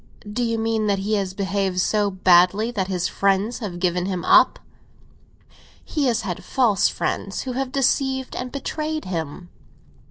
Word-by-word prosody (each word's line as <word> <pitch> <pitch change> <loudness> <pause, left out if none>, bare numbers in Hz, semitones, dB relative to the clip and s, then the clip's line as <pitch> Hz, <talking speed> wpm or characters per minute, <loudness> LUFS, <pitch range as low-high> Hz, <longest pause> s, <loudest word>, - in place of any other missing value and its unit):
"Do 210 +4 -2
you 230 -1 0
mean 225 -1 0
that 200 -1 +2
he 200 +3 -2
has 195 -3 -1
behaved 195 -2 -1
so 205 +2 +1
badly 185 +4 +4
that 195 -5 -2
his 180 -2 -1
friends 200 +4 0
have 200 -7 -5
given 180 0 0
him 185 -3 -3
up?" - - +5 1.3
"He 295 -4 -1
has 235 -1 +1
had 185 -5 -5
false 230 -8 +2
friends, 195 - -3
who 260 - -4
have 260 +1 -3
deceived 265 0 0
and 250 0 -5
betrayed 305 +2 -4
him." 175 0 -5
205 Hz, 160 wpm, -22 LUFS, 185-245 Hz, 1.3 s, up